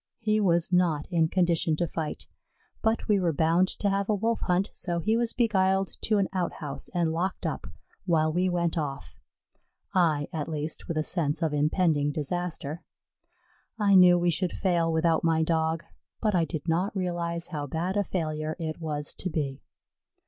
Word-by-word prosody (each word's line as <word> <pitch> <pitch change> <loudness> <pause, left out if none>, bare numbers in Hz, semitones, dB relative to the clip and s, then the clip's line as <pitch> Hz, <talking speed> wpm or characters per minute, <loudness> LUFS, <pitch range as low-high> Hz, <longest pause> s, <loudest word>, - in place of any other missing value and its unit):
He 215 -2 +1
was 175 -3 +2
not 170 -5 +2
in 165 -2 +3
condition 170 -2 +2
to 175 - 0
fight, 160 -1 -4 0.6
but 220 0 0
we 210 -3 +3
were 175 -3 +1
bound 165 +4 +3
to 205 - -1
have 200 +1 0
a 210 - +3
Wolf 225 +3 0
hunt, 180 +2 0
so 175 -2 -2
he 215 +6 +1
was 235 0 +1
beguiled 195 -5 +2
to 215 - +2
an 195 -2 +2
outhouse 170 -6 -3
and 170 -2 +1
locked 180 +4 -2
up, - - -3 0.4
while 155 -2 +2
we 180 +2 +1
went 170 -1 0
off, 135 - -5 0.8
I, 160 -6 +2
at 155 -1 -3
least, 155 0 -4
with 165 - -3
a 155 - +1
sense 155 -1 0
of 160 -2 0
impending 150 0 +2
disaster. 160 +1 -3 1.0
I 205 -2 +3
knew 180 -2 +8
we 175 0 +2
should 170 +3 -1
fail 170 -3 +1
without 160 0 +2
my 160 -1 +3
Dog, 160 0 0 0.4
but 215 -2 +1
I 170 -3 +3
did 160 -1 -6
not 180 +6 0
realize 170 -2 -2
how 145 -3 -4
bad 170 +7 -2
a 205 - +2
failure 155 -4 -3
it 160 -1 -4
was 150 -2 -2
to 185 - -4
be. 145 -4 -3
170 Hz, 180 wpm, -27 LUFS, 155-185 Hz, 1.0 s, knew